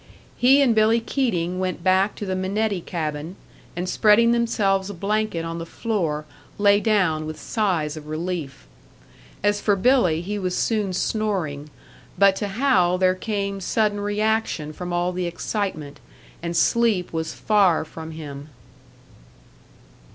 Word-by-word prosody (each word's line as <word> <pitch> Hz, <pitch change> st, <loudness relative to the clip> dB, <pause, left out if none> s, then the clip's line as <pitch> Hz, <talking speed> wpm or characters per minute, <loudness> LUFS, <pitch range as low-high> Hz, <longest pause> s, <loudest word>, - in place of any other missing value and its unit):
He 270 Hz, +3 st, +5 dB
and 245 Hz, -4 st, +3 dB
Billy 220 Hz, +1 st, +4 dB
Keating 185 Hz, -8 st, -1 dB
went 185 Hz, -2 st, -3 dB
back 190 Hz, +3 st, +3 dB
to 205 Hz, -, -5 dB
the 190 Hz, -1 st, -2 dB
Minetti 195 Hz, +1 st, -1 dB
cabin, 155 Hz, 0 st, -4 dB, 0.4 s
and 175 Hz, +1 st, -3 dB
spreading 220 Hz, +4 st, +4 dB
themselves 205 Hz, -5 st, +1 dB
a 200 Hz, -, -6 dB
blanket 200 Hz, -2 st, -1 dB
on 165 Hz, 0 st, -4 dB
the -, -, -4 dB
floor, 165 Hz, -9 st, -2 dB, 0.3 s
lay 205 Hz, 0 st, +4 dB
down 185 Hz, -8 st, +1 dB
with 155 Hz, -, -7 dB
sighs 175 Hz, -9 st, -1 dB
of 155 Hz, -1 st, -9 dB
relief. 155 Hz, -, -4 dB, 0.8 s
As 205 Hz, 0 st, +2 dB
for 205 Hz, -, +2 dB
Billy, 190 Hz, -7 st, +3 dB
he 205 Hz, +4 st, -4 dB
was 185 Hz, -2 st, -2 dB
soon 210 Hz, -4 st, 0 dB
snoring; 180 Hz, -9 st, -2 dB, 0.5 s
but 200 Hz, -1 st, +5 dB
to 205 Hz, -, -2 dB
Hal 195 Hz, -5 st, +2 dB
there 185 Hz, 0 st, +3 dB
came 200 Hz, 0 st, -3 dB
sudden 210 Hz, +2 st, 0 dB
reaction 205 Hz, -6 st, -1 dB
from 180 Hz, +2 st, -6 dB
all 175 Hz, +1 st, 0 dB
the 180 Hz, -1 st, -2 dB
excitement, 170 Hz, -4 st, -4 dB, 0.4 s
and 170 Hz, 0 st, -3 dB
sleep 215 Hz, -2 st, +2 dB
was 160 Hz, -1 st, -3 dB
far 195 Hz, -7 st, +2 dB
from 160 Hz, +1 st, -9 dB
him. 145 Hz, -2 st, -8 dB
190 Hz, 145 wpm, -23 LUFS, 165-215 Hz, 0.8 s, He